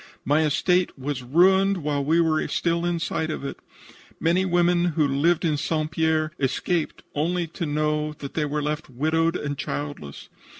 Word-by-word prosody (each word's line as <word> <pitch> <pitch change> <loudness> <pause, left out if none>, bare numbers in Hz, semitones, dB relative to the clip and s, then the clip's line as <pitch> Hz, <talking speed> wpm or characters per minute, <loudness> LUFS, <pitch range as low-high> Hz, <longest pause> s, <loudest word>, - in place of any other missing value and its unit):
My 150 +4 +3
estate 175 +4 +1
was 135 0 -3
ruined 190 +9 +4
while 145 -1 0
we 160 +4 +2
were 160 -2 +2
still 170 0 0
in 175 -1 0
sight 160 -1 -2
of 155 - -4
it. - - -6 0.6
Many 175 +3 +2
women 175 -1 +2
who 150 -2 +4
lived 155 +6 +2
in 155 -3 +1
St. 155 +1 -1
Pierre 160 0 +1
escaped 155 +5 -1
only 170 +4 0
to 165 +1 -5
know 150 0 0
that 140 -2 -8
they 155 - 0
were 150 0 -2
left 150 +1 -3
widowed 160 +6 +1
and 145 -4 -3
childless. 145 - -5
155 Hz, 170 wpm, -24 LUFS, 145-170 Hz, 0.6 s, ruined